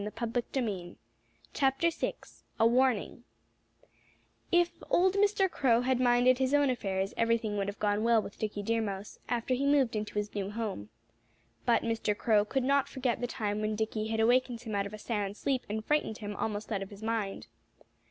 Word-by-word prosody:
VI 225 -3 -3 1.6
A 225 - +5
WARNING 245 -1 +2 1.3
If 350 0 +2
old 370 +1 +4
Mr. 400 -1 +3
Crow 245 -9 +2
had 255 0 +1
minded 245 +1 +4
his 265 +2 +2
own 285 -2 +4
affairs 195 -5 -2
everything 230 -2 +1
would 200 -1 -1
have 200 - -4
gone 210 0 0
well 230 -1 +4
with 205 - -7
Dickie 210 -1 -3
Deer 230 +2 +1
Mouse, 200 -1 -5
after 240 +1 0
he 275 +3 0
moved 275 -5 +3
into 210 0 -4
his 210 0 -2
new 200 -2 -3
home. 205 - -4 0.8
But 235 - +4
Mr. 225 -2 -1
Crow 210 -3 +3
could 265 +4 -1
not 280 +1 +2
forget 255 -3 -1
the 245 - 0
time 210 -3 -2
when 215 0 -1
Dickie 220 0 -2
had 220 0 -2
awakened 240 +1 +2
him 225 -3 -6
out 200 0 0
of 200 - -12
a - - -9
sound 205 -2 -3
sleep 265 -2 -1
and 215 +1 -3
frightened 295 -7 0
him 205 -1 -6
almost 210 +1 -3
out 200 -2 -1
of 195 - -6
his 205 +1 -12
mind. 220 -3 -2
225 Hz, 180 wpm, -30 LUFS, 210-250 Hz, 1.6 s, A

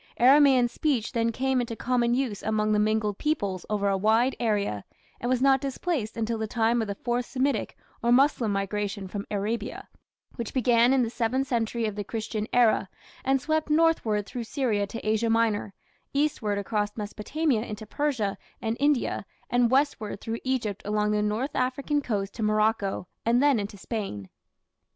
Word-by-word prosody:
Aramaean 265 -1 +6
speech 245 -2 -1
then 230 -2 +1
came 260 +2 0
into 235 -1 -4
common 240 0 +1
use 245 -6 -2
among 215 0 0
the 210 - +3
mingled 210 -1 +1
peoples 200 - -1
over 205 -1 0
a 195 - +2
wide 220 +6 +2
area, 205 - 0 0.4
and 240 - -2
was 255 0 +1
not 270 -1 +5
displaced 275 -4 -2
until 225 0 -1
the 220 - -2
time 230 +1 +1
of 220 - -2
the 200 - -3
Fourth 240 +3 -2
Semitic 270 +1 -1 0.2
or 235 - +2
Moslem 250 -3 +4
migration 200 0 -2
from 200 +2 -6
Arabia, 210 +2 -3 0.5
which 235 0 -5
began 240 -1 +4
in 265 -2 +4
the 230 - -2
seventh 245 +3 0
century 235 -2 -1
of 215 - -2
the 205 - -3
Christian 215 0 -4
era, 225 -5 +3 0.3
and 270 0 +2
swept 310 +3 -1
northward 300 -10 +2
through 235 +2 -5
Syria 225 -6 0
to 225 +1 -7
Asia 220 +1 +1
Minor, 225 -3 +1 0.4
eastward 275 -8 0
across 205 +1 -2
Mesopotamia 220 +5 -1
into 215 -1 -6
Persia 235 -5 -1 0.2
and 225 0 -2
India, 285 -2 +1 0.3
and 245 -1 +3
westward 260 -7 +1
through 225 +2 -4
Egypt 235 -6 -1
along 210 0 0
the 210 0 +1
north 215 +7 -1
African 275 +3 0
coast 200 -6 -2
to - - -7
Morocco, 215 -3 +1 0.2
and 235 +2 +3
then 285 -5 +4
into 205 0 -5
Spain. 190 - -5
230 Hz, 170 wpm, -27 LUFS, 210-255 Hz, 0.5 s, Aramaean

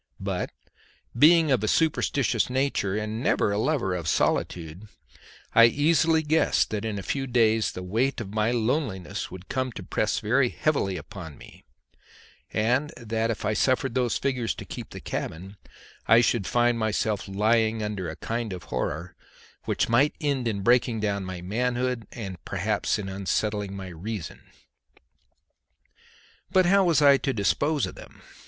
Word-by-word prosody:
But - - -3 0.7
being 155 +3 +6
of 125 -5 +2
a - - +1
superstitious 140 -5 +1
nature 130 -7 0
and 110 +1 -3
never 105 - +2
a 100 - 0
lover 125 -7 0
of 85 -3 -4
solitude, 85 +5 -1 0.7
I 115 - +8
easily 160 +5 +3
guessed 155 +2 +2
that 105 -1 -2
in 110 -2 -3
a 100 - -5
few 135 +7 -2
days 115 -3 +2
the 90 - -6
weight 115 +10 0
of 105 -3 -6
my 110 +1 +1
loneliness 110 - -2
would 95 +1 -10
come 130 -1 -2
to 95 - -7
press 105 +4 -1
very 125 +4 +2
heavily 110 -13 0
upon 80 -2 -9
me, - - -15 0.9
and 125 +8 +1
that 115 0 -2
if 110 -2 -3
I 105 - +1
suffered 130 +3 +1
those 125 -2 +1
figures 130 -4 -1
to - - -8
keep - - -8
the - - -9
cabin 95 +5 -5 0.5
I 115 +2 +7
should 115 -5 +1
find 120 +3 +2
myself 110 -1 -1
lying 110 +2 +1
under 100 -5 -3
a 80 - -6
kind 115 0 -3
of 90 - -7
horror 80 +5 -3 0.5
which - - 0
might 130 +6 +3
end 140 -6 -1
in 100 -3 -2
breaking 120 +1 +3
down 100 -2 -1
my 90 -1 -6
manhood 125 +3 -1
and 95 -7 -7
perhaps - - -1
in 100 - -5
unsettling 100 +1 -2
my 95 -1 -7
reason. 95 +2 -6 2.1
But 185 -1 +4
how 195 +2 +4
was 165 -4 +3
I 140 -1 +7
to 135 0 -2
dispose 140 +8 +1
of - - -7
them? - - -14
110 Hz, 160 wpm, -26 LUFS, 100-130 Hz, 2.1 s, I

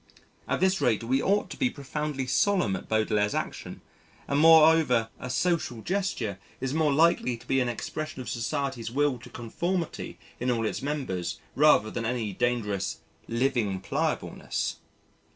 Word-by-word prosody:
At - - -1
this 190 0 +2
rate 115 -2 +2
we 130 +4 +1
ought 205 +2 +1
to - - -7
be 260 - +3
profoundly 145 - -4
solemn 130 - +2
at 90 - -8
Baudelaire's 105 -1 +1
action - - -4 0.5
and 140 - +1
moreover 160 -7 +6
a 125 - -6
"social 125 -5 0
gesture" 175 - -2 0.2
is 130 +1 -2
more 155 -1 +2
likely 140 -5 +3
to - - -17
be 135 - +1
an 125 -1 +1
expression 155 +5 -5
of 125 - -6
society's 120 0 -2
will 140 0 +1
to 125 - -12
conformity 170 +9 -3 0.2
in 125 - -1
all 115 -2 +1
its - - -2
members 130 - -3 0.2
rather 130 -7 +5
than 115 - -3
any 115 -3 -2
dangerous 105 -4 -1 0.3
"living 115 -5 0
pliableness." 95 - -2
125 Hz, 150 wpm, -27 LUFS, 115-155 Hz, 0.5 s, moreover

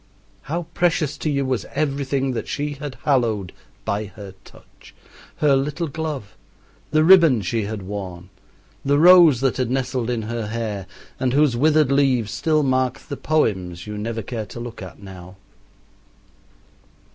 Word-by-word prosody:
How 170 +3 -1
precious 165 -4 +1
to 155 - -1
you 140 -2 0
was 130 -5 -2
everything 140 -2 -1
that 120 - -4
she 145 0 -2
had 145 -2 -7
hallowed 115 - +1 0.3
by 105 +2 -1
her 100 -1 -10
touch - - -18 0.4
her 145 -2 +3
little 150 +5 -1
glove, 145 - -5 0.5
the 155 0 +3
ribbon 165 - +6
she 110 +3 -1
had 105 -1 -5
worn, 95 -2 -7 0.5
the 140 +1 +2
rose 170 -5 +7
that 135 -1 +1
had 130 -3 -1
nestled 130 -2 -1
in 120 -3 -1
her 115 0 -4
hair 105 -4 -4 0.3
and 130 -1 0
whose 145 -3 +3
withered 150 +1 +3
leaves 130 -6 +2
still 155 -2 +1
mark 130 -1 +1
the 140 - -8
poems 95 - -1
you 105 0 -6
never 115 +1 -4
care 110 -1 -5
to 120 - -9
look 120 -2 -7
at 95 -2 -10
now. 90 -1 -11
130 Hz, 155 wpm, -22 LUFS, 105-145 Hz, 0.5 s, rose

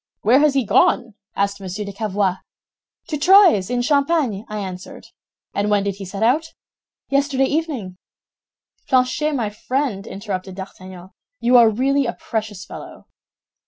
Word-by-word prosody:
"'Where 240 +6 +5
has 295 -2 +3
he 270 -3 +2
gone?' 230 +3 +2 0.2
asked 200 0 -1
Monsieur 195 +2 -5
de 200 - -7
Cavois. 200 -3 -1 0.7
"'To 305 - -3
Troyes, 350 - +6
in 245 0 0
Champagne,' 280 -6 +1
I 215 - -4
answered. 185 -2 -7 0.5
"'And 205 +1 0
when 205 -1 +2
did 200 -1 -3
he 200 - -7
set 195 +3 -4
out?' 305 +8 +1 0.5
"'Yesterday 275 -1 +2
evening.'" 265 - -3 0.9
"Planchet, 265 +4 +1
my 225 -5 -2
friend," 240 -2 -3
interrupted 195 -2 -5
D'Artagnan, 185 -1 -10 0.3
"you 245 +2 +3
are 235 -2 +8
really 270 +4 +1
a 235 - -2
precious 215 -4 -5
fellow." - - -11
220 Hz, 145 wpm, -20 LUFS, 195-275 Hz, 0.9 s, are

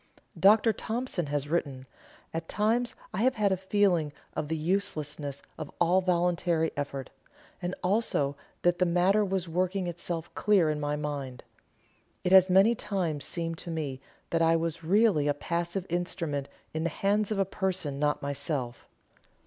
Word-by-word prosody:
Dr. 215 +3 +6
Thompson 225 - -3
has 145 0 -1
written: 140 -5 -2 0.5
"At 165 0 -4
times 230 +4 +1 0.2
I - - -2
have 255 +2 +3
had 205 -2 +2
a - - +3
feeling 190 -5 +1 0.2
of 150 - -2
the 160 +1 -1
uselessness 155 -5 -2 0.2
of 150 - -5
all 175 +2 +4
voluntary 175 -2 +1
effort, 140 -2 -4 0.5
and 175 +1 -2
also 180 -8 +1 0.3
that 175 0 +3
the 180 - +4
matter 180 +5 +3
was 190 -2 -1
working 185 +3 0
itself 170 -1 -4
clear 190 -7 +3
in 150 - -3
my 145 0 -1
mind. 140 -4 -4 0.8
It 180 - 0
has 190 0 +8
many 195 +5 +6
times 175 -10 -2
seemed 165 -1 -3
to - - -6
me 145 -5 -3 0.3
that 165 - +2
I 165 0 +4
was 165 0 -2
really 190 -4 +3
a 145 - +2
passive 170 +4 -2
instrument 165 -5 -2 0.2
in 160 0 -2
the 170 - +1
hands 200 +5 +1
of 215 - -1
a 195 - +2
person 185 -7 -2
not 150 0 0
myself. 140 -3 -3
170 Hz, 160 wpm, -29 LUFS, 150-190 Hz, 0.8 s, has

